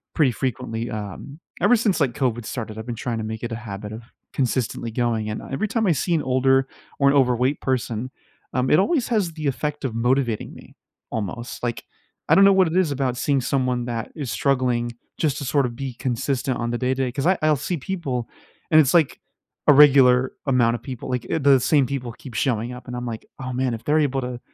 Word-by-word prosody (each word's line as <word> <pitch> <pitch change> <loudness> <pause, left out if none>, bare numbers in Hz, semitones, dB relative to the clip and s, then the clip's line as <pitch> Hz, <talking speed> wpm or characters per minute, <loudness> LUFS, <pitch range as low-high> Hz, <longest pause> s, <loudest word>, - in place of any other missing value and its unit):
pretty 145 -6 +4
frequently, 120 -2 -3
um, 110 - -7 0.2
ever 245 - +5
since, 210 -6 +1
like, 135 -5 +1
COVID 120 -1 -1
started, 110 -3 -5
I've 110 - -6
been 120 -1 -4
trying 120 0 -3
to 110 - -3
make 110 +1 -6
it 120 - -3
a 115 - -2
habit 105 -2 -7
of 110 +2 -8 0.3
consistently 120 -3 -1
going, 115 -2 -1
and, 105 - -4
uh, - - -11
every 135 +11 -1
time 220 +1 0
I 185 - +4
see 170 +3 0
an 160 - +2
older 135 +1 +3 0.3
or 140 0 +5
an 140 - +3
overweight 125 +1 +2
person, 125 -2 -2 0.4
um, 130 0 +1
it 150 - +5
always 255 - +1
has 200 -8 0
the 155 -3 -3
effect 150 +2 -2
of 120 -4 -3
motivating 120 -1 0
me - - -15 0.3
almost. 115 +3 -5
Like, 120 -1 -2 0.5
I - - +6
don't 195 +1 +7
know 195 - +7
what 190 -2 +4
it 165 +3 -1
is 180 -5 +2
about 130 -3 -1
seeing 140 +1 +1
someone 125 -2 0
that 115 -2 -4
is 140 -8 -4
struggling 125 0 0 0.2
just 150 -4 0
to 145 - -5
sort 140 +1 +2
of 120 -1 -4
be 130 -1 -5
consistent 130 +1 -1
on 120 0 -2
the 120 - -1
day-to-day. 130 0 0
'Cause 135 +2 -3
I 185 - +4
I'll 155 -2 +3
see 175 +6 -2
people, 140 -7 -3 0.4
and 155 - +6
it's 145 -1 +4
like 160 -5 +3 0.5
a 145 - +9
regular 130 -3 +6
amount 120 -3 +3
of 115 - -8
people, 130 -4 -7
like, 125 -2 -2
i - - +2
the 140 -2 +5
same 140 +1 +3
people 125 -2 -4
keep 125 0 -12
showing 120 -1 0
up, 125 +1 -11
and 125 - -5
I'm 125 0 -4
like, 115 -2 -6
"Oh, 130 -1 -5
man. 125 -1 0
If 115 - -6
they're 155 +1 +2
able 135 -2 +1
to 125 -1 -5
130 Hz, 225 wpm, -23 LUFS, 120-140 Hz, 0.5 s, a